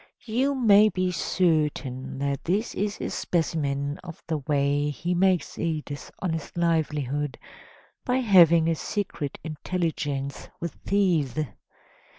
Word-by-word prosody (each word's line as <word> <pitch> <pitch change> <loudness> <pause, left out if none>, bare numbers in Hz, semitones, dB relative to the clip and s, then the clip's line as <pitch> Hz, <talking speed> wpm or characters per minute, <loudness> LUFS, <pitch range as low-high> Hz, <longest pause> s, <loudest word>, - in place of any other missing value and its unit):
You 255 +5 +1
may 215 -4 +6
be 185 -1 0
certain 150 -7 0
that 140 0 -2
this 200 +7 0
is 205 +1 -2
a - - -3
specimen 145 -4 -1
of 170 -2 -10
the 160 -2 -1
way 145 0 +1
he 170 +4 -2
makes 180 -2 +1
a 160 -2 0
dishonest 160 +3 -5
livelihood, 150 -4 0 0.7
by 250 - 0
having 170 -9 +6
a 165 - +3
secret 160 -4 -3
intelligence 150 -4 -3
with 170 -1 -3
thieves. 170 -10 +1
165 Hz, 120 wpm, -26 LUFS, 145-185 Hz, 0.7 s, may